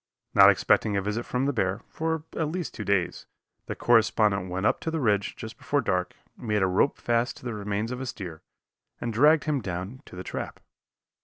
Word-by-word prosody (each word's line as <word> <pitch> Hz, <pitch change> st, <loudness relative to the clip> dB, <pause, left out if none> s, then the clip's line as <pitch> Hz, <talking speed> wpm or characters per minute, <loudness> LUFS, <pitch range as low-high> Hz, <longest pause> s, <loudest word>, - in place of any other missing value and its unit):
Not -, -, +9 dB
expecting 105 Hz, -2 st, +3 dB
a -, -, +1 dB
visit 105 Hz, +4 st, -3 dB
from 125 Hz, +2 st, 0 dB
the 140 Hz, -, +1 dB
bear, 95 Hz, -2 st, 0 dB
for 160 Hz, -1 st, -2 dB
at 160 Hz, -, 0 dB
least 175 Hz, +1 st, -4 dB
two 105 Hz, -, -5 dB
days, 100 Hz, -4 st, 0 dB, 0.4 s
the -, -, -4 dB
correspondent 105 Hz, -5 st, +3 dB
went 95 Hz, +3 st, -2 dB
up -, -, +2 dB
to -, -, -3 dB
the 160 Hz, 0 st, -2 dB
ridge 105 Hz, -6 st, +1 dB
just 115 Hz, +1 st, -9 dB
before 145 Hz, +1 st, 0 dB
dark, 90 Hz, -7 st, -1 dB, 0.2 s
made 105 Hz, -4 st, -1 dB
a -, -, +3 dB
rope 95 Hz, +9 st, +2 dB
fast 120 Hz, +1 st, 0 dB
to 130 Hz, -, -14 dB
the 120 Hz, -, -3 dB
remains 105 Hz, +2 st, -3 dB
of 125 Hz, +1 st, -4 dB
a 130 Hz, -, -4 dB
steer, 90 Hz, -9 st, -7 dB, 0.6 s
and 120 Hz, -1 st, -3 dB
dragged 150 Hz, +6 st, +5 dB
him 150 Hz, -3 st, 0 dB
down 95 Hz, +7 st, -5 dB
to -, -, -11 dB
the 90 Hz, -, -6 dB
trap. -, -, -5 dB
110 Hz, 210 wpm, -27 LUFS, 100-130 Hz, 0.6 s, Not